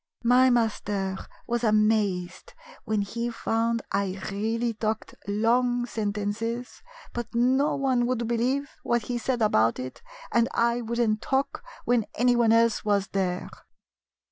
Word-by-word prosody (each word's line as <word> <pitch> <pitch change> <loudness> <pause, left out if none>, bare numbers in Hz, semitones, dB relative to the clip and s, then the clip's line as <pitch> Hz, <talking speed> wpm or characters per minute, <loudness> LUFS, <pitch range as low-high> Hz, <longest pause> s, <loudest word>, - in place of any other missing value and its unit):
My 250 +2 +5
master 205 -5 0 0.3
was 240 0 -1
amazed 215 -4 +1 0.3
when 215 -2 0
he 235 +4 -3
found 230 0 -1
I 195 -1 -1
really 225 +4 -1
talked 220 0 -3
long 240 +4 +2
sentences, 220 +2 -3 0.3
but 240 -1 -3
no 260 +5 +3
one 260 -3 +1
would 240 -2 -1
believe 255 +5 0
what 235 -1 0
he 240 +2 -3
said 245 -1 0
about 115 - +3
it, 130 0 -7 0.3
and 235 0 +3
I 235 +1 +2
would 235 +1 -3
n't 215 -2 +1
talk 270 - -1 0.2
when 240 -3 +2
anyone 240 -1 +3
else 230 -1 +3
was 200 -2 +1
there." 185 -2 -1
230 Hz, 135 wpm, -26 LUFS, 210-240 Hz, 0.3 s, My